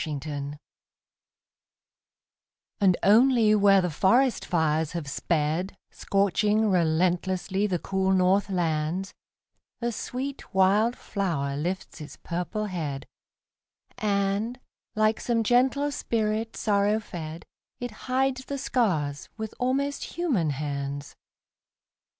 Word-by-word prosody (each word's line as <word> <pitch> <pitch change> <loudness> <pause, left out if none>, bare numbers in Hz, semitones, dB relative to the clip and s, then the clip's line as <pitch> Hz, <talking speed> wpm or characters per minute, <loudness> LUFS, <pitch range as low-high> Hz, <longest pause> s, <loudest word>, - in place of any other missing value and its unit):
FIRE 150 -3 -3
FLOWERS 145 -1 -5 2.3
And 185 -3 +4
only 225 +1 +5
where 200 -2 +5
the 180 -2 -1
forest 235 - +3
fires 160 -3 +1
have 170 -4 -4
sped, 165 +6 -1
Scorching 205 +2 +1
relentlessly 185 +3 +1
the 185 -3 0
cool 190 +2 0
north 190 +2 +3
lands, 170 0 -1 0.7
A 235 0 -1
sweet 260 +2 -5
wild 205 +5 +4
flower 155 -9 -2
lifts 175 +2 -4
its 150 - -9
purple 180 +5 -3
head, 155 -8 -4 0.9
And, 205 +3 0 0.4
like 215 +1 +2
some 230 -2 0
gentle 260 +5 +2
spirit 225 -3 -1
sorrow 205 0 +2
fed, 165 -5 -7 0.3
It 245 -1 -4 0.2
hides 260 0 +1
the 280 - -4
scars 165 - -1
with 220 -1 -5
almost 275 +3 -1
human 255 - +1
hands. 140 0 -4
195 Hz, 105 wpm, -26 LUFS, 160-225 Hz, 2.3 s, only